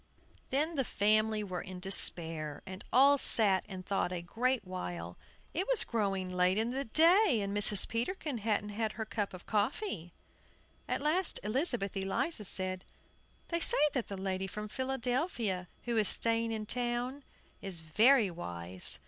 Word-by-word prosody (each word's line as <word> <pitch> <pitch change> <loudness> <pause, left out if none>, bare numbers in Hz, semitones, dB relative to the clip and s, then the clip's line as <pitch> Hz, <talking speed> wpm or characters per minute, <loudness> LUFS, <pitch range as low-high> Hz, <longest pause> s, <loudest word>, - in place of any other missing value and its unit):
Then 305 +4 -1
the 270 - +1
family 215 0 0
were 185 -3 -6
in 185 -1 -9
despair, 165 -5 +4
and 190 0 -9
all 275 +3 +4
sat 200 -7 +5
and 185 -2 -8
thought 195 -3 -2
a 175 -2 -5
great 250 +7 -2
while. 90 - -7 0.4
It 370 +4 -3
was - - +2
growing 195 -5 -3
late 180 +1 +1
in 225 +2 -1
the 270 +2 -4
day, 325 - +4
and 200 0 -4
Mrs. 205 -1 +6
Peterkin 250 - -4
hadn't 210 -1 -2
had 215 +1 -4
her 220 - -6
cup 205 -1 -4
of 185 -1 -12
coffee. 215 - -3 0.8
At - - -3
last 335 +4 +2
Elizabeth 225 - -2
Eliza 195 - -2
said, 185 0 -4 0.7
"They 335 - -2
say - - +4 0.2
that 255 -4 -3
the 200 - -7
lady 190 0 -4
from 210 +3 -7
Philadelphia, 245 - -3 0.2
who 240 -1 -3
is 215 -2 +2
staying 230 0 +3
in 215 -1 -4
town, 245 +4 -2 0.4
is 185 -4 -4
very 215 - +2
wise. 90 - 0
215 Hz, 155 wpm, -31 LUFS, 185-250 Hz, 0.8 s, Mrs